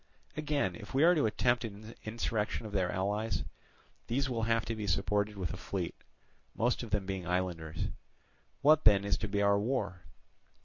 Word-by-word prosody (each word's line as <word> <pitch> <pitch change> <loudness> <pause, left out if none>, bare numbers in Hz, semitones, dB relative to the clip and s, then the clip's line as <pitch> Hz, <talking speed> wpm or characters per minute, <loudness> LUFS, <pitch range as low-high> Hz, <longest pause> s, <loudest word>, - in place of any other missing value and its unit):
Again, 145 - 0
if 105 +8 -9
we 140 - +5
are 175 +2 +7
to 150 -9 +3
attempt 120 +3 +2
an 110 0 -7
insurrection 110 0 -1
of 105 - -6
their 95 -3 +1
allies, 105 +4 -1 0.6
these 135 +4 +1
will 115 -2 -1
have 115 -1 +2
to 115 - -2
be 105 -2 -4
supported 100 +3 +1
with 90 -3 -2
a - - -5
fleet, 90 -2 -3 0.6
most 120 +2 +1
of 120 - -6
them 105 -2 0
being 95 -2 -4
islanders. 85 -4 -1 0.7
What 155 +1 +6
then 100 -2 +6
is 100 0 +2
to 110 - -2
be 100 0 +1
our 100 0 +4
war? 105 -5 -1
105 Hz, 180 wpm, -32 LUFS, 95-115 Hz, 0.7 s, are